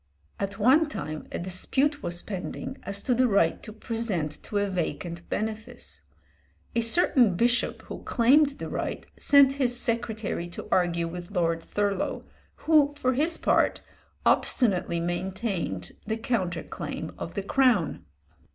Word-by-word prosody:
" 75 - -36
At 195 - -12
one 265 +9 +5
time 155 - -5
a - - -3
dispute 265 - 0
was 175 0 -3
pending 215 +7 -5
as 200 0 -3
to 250 - +2
the 255 +1 +3
right 195 -7 +2
to - - -9
present 215 - -3
to 205 - -3
a 205 0 +1
vacant 170 -2 -4
benefice. 220 +3 -5 0.7
A 235 - +2
certain 230 - +4
bishop 240 +5 +1
who - - -8
claimed 280 +4 +4
the - - -5
right - - -4
sent 280 -2 +6
his 245 -1 +1
secretary 225 -7 -2
to 175 - -8
argue 170 -2 +2
with 175 +1 -7
Lord 165 -1 +1
Thurlow, 200 +1 -1 0.4
who, 295 -2 +4
for 255 -3 +1
his 315 +6 +2
part, - - +2 0.4
obstinately 185 -8 +2
maintained 175 - -3 0.2
the 220 +1 -1
counter 190 -7 -1
claim - - -6
of - - -6
the 200 - -2
Crown. 225 - +2
210 Hz, 145 wpm, -27 LUFS, 175-250 Hz, 0.7 s, sent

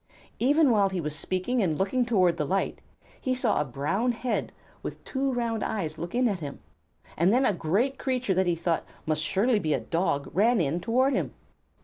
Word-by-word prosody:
Even 285 +2 +4
while 200 -3 +4
he 190 -1 -3
was 150 -2 -3
speaking 185 +9 -1
and 160 -6 +1
looking 235 +6 +1
toward 185 -7 +3
the - - 0
light, 190 +6 -1 0.4
he 255 -1 0
saw 255 - +1
a - - -1
brown 150 - -1
head 245 +2 -2 0.3
with - - -7
two 270 0 -1
round 235 -3 -1
eyes 190 -8 -3
look 175 +4 -5
in 250 0 +3
at 200 -5 -1
him, 145 -3 -6 0.6
and 170 +4 +3
then 255 +4 +3
a 210 - +3
great 205 - 0
creature 255 -6 0
that 185 0 +1
he 175 - +2
thought 165 0 -1 0.2
must 155 -1 0
surely 205 +9 +2
be 155 -5 +1
a - - -1
dog 140 +3 -1
ran 220 +6 +3
in 165 +1 0
toward 255 +8 +2
him. - - -2
195 Hz, 205 wpm, -27 LUFS, 165-245 Hz, 0.6 s, Even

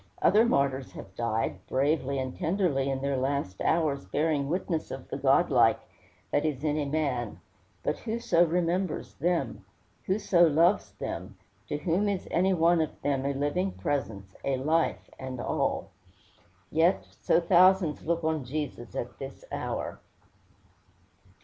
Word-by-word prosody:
Other 215 +5 +5
martyrs 140 - 0
have 95 - -10
died, 115 -1 -2
bravely 140 0 +1
and 130 -1 -3
tenderly, 160 -7 0
in 135 -1 -2
their 140 -1 0
last 130 -8 -2
hours 155 -4 +1
"bearing 150 -2 0
witness 170 -1 -2
of - - -7
the - - -3
godlike" - - +4 0.5
that - - +2
is 150 -3 -2
in 150 -2 0
man; 125 - -1 0.4
but - - -1
who 225 0 -3
so 185 -8 +3
remembers 175 0 -1
them? 135 - -1 0.4
Who 190 - +2
so 200 -4 +2
loves 165 - +4
them? 95 0 -6 0.3
To 145 - -2
whom 180 +7 +1
is 195 -3 -3
any 185 +3 +3
one 170 -1 +4
of 155 - -4
them 140 -1 0
a 140 - 0
living 180 +7 0
presence, 100 -9 -3
a 135 -1 0
life, 155 +5 0
and 130 -1 -6
all? - - -1 0.8
Yet 165 +4 +3 0.2
so - - +4
thousands 180 -1 +4
look 170 +1 -1
on 160 -2 0
Jesus 130 -3 -5
at 120 +1 -5
this 135 0 -8
hour. - - -4
150 Hz, 145 wpm, -28 LUFS, 135-170 Hz, 0.8 s, Other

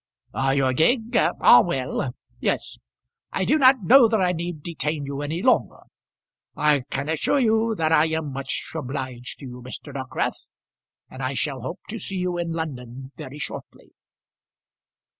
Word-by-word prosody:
"Your 135 -1 +1
gig? 225 - +2
ah, - - +6
well. - - -2 0.2
Yes. - - -2 0.5
I - - -1
do 310 - +3
not 260 -4 +6
know 245 +4 +7
that 220 -1 +1
I 180 -1 +2
need 170 -3 -5
detain 150 -3 -3
you 140 0 -4
any 160 +6 -3
longer. 255 - +2 0.7
I 145 -4 +2
can 140 +2 -3
assure 160 - +1
you 225 -2 +2
that 160 -4 0
I 155 -1 +5
am 160 -3 -2
much 135 0 -4
obliged 130 -4 -5
to - - -8
you, 125 -1 -9
Mr. 130 +3 -9
Dockwrath, 130 -1 -3 0.6
and 130 - -10
I 130 +1 -2
shall 135 -1 -2
hope 145 +10 -6
to 225 +2 -5
see 195 - -4
you 180 -1 -1
in 170 -1 -2
London 130 -5 -6
very 145 -2 -9
shortly." 150 - -8
155 Hz, 160 wpm, -24 LUFS, 135-180 Hz, 0.7 s, know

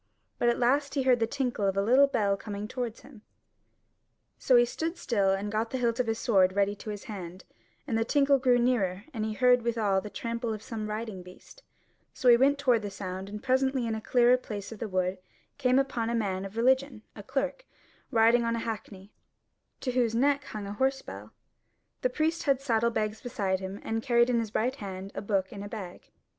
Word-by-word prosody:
But 240 - +3
at 235 - +1
last 280 +4 +1
he 275 - +1
heard 255 -2 +4
the 225 - +1
tinkle 245 -6 -1
of 195 0 -1
a - - +3
little 260 +6 +5
bell 210 -7 +1
coming 205 +1 -6
towards 240 -1 -5
him: 250 -7 -15 1.2
so 255 - +3
he 240 0 +6
stood 325 +8 -4
still 200 - +1
and 200 +2 -2
got 220 +1 -1
the 260 - -3
hilt 235 -2 0
of 250 - +1
his 225 0 0
sword 190 -5 +3
ready 200 0 +2
to 215 - -8
his 205 -1 -6
hand; 185 -4 -8 0.4
and 240 - -2
the 225 - +2
tinkle 275 +2 +3
drew 250 -1 +4
nearer, 210 -6 +1
and 220 -3 -3
he 220 - -2
heard 250 +2 +4
withal 220 -5 +1
the 210 - -7
trample 230 +2 -3
of 215 - -11
some 220 -3 -5
riding 215 -3 -4
beast; 180 - -15 0.5
so 250 - +3
he 240 - +9
went 275 +4 +3
toward 250 -5 +2
the 205 - -4
sound, 190 0 -6
and 210 +1 -7
presently 265 -1 +1
in 225 - -1
a 220 - -4
clearer 245 +2 +4
place 210 -5 -7
of 220 - -9
the 225 - -4
wood 185 0 -1 0.4
came 255 -2 +3
upon 255 -4 0
a 235 - 0
man 195 -4 -1
of 195 +3 -9
religion, 260 -1 +2
a 205 - -8
clerk, 270 - -3 0.4
riding 230 +1 +4
on 230 0 0
a - - -2
hackney, 205 -3 -6 0.7
to 255 - -1
whose 240 -3 +1
neck 280 +3 +2
hung 210 -2 -6
a 200 - -5
horse 265 +4 0
bell: - - -9 0.7
the 255 - +2
priest 315 +5 0
had 275 -3 +3
saddle 235 -4 +1
bags 215 -1 -2
beside 195 -6 -1
him 190 +1 -6
and 225 0 -2
carried 240 0 +3
in 235 - +2
his 220 -2 -4
right 255 +5 0
hand 195 -2 -7
a - - -5
book 195 -2 -1
in 200 - -7
a 205 - -7
bag. 195 -5 -8
230 Hz, 220 wpm, -28 LUFS, 205-255 Hz, 1.2 s, he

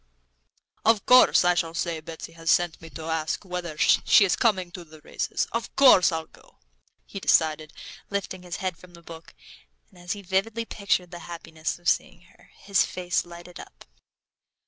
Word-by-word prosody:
"Of 220 -3 +3
course 250 -6 +6
I 180 - +5
shall 165 -2 -2
say 170 -2 -2
Betsy 160 +1 -9
has 165 0 -6
sent 175 0 +2
me 165 - -11
to 160 - -9
ask 160 +3 -3
whether 180 -4 -5
she's 195 +3 +4
coming 190 -6 +1
to 175 - -9
the 155 -1 -16
races. - - -3
Of 230 0 -4
course, 250 -11 +6
I'll 160 -1 -3
go," - - -22 0.5
he 195 - -8
decided, 155 -4 +2 0.4
lifting 200 -2 -4
his 180 -1 -7
head 185 -3 -4
from 175 -1 -16
the 170 - -17
book. 165 0 -12 0.6
And 180 - -19
as 175 0 -4
he 205 -1 -10
vividly 205 +5 -1
pictured 195 -5 -1
the 175 - -8
happiness 165 -2 -5
of 175 0 -11
seeing 175 -2 0
her, - - -23
his 200 -1 +3
face 180 -1 -2
lighted 175 +1 -12
up. - - -13
175 Hz, 175 wpm, -25 LUFS, 165-190 Hz, 0.6 s, course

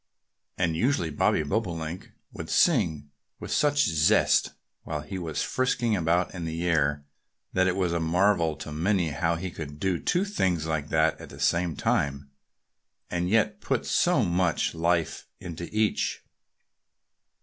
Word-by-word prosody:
And 85 -3 0
usually 85 - +1
Bobby 75 - +2
Bobolink 85 -1 -3 0.2
would - - -7
sing 75 -3 +2 0.3
with - - -7
such 145 -1 +3
zest 80 -1 +3 0.3
while 75 -2 -4
he 95 +5 -6
was 80 -4 -3
frisking 120 -3 0
about 85 0 +1
in 90 -3 -5
the 80 +2 -3
air 75 -4 +1 0.5
that 95 0 +3
it 90 - +1
was 90 -3 0
a 85 - 0
marvel 85 0 +2
to 75 - -8
many 85 +2 +1
how 85 +3 0
he 90 +2 -5
could 75 -2 -8
do 95 -1 0
two 180 +3 +1
things 95 - 0
like 80 -2 -2
that, 80 0 +1
at - - -10
the - - -12
same 85 -1 +1
time, 70 0 -1 0.8
and 90 0 -1
yet 105 0 +1
put - - -1
so - - +2
much 85 -1 +1
life 85 -1 -1
into 85 -1 -7
each. 110 0 0
85 Hz, 150 wpm, -27 LUFS, 80-95 Hz, 0.8 s, such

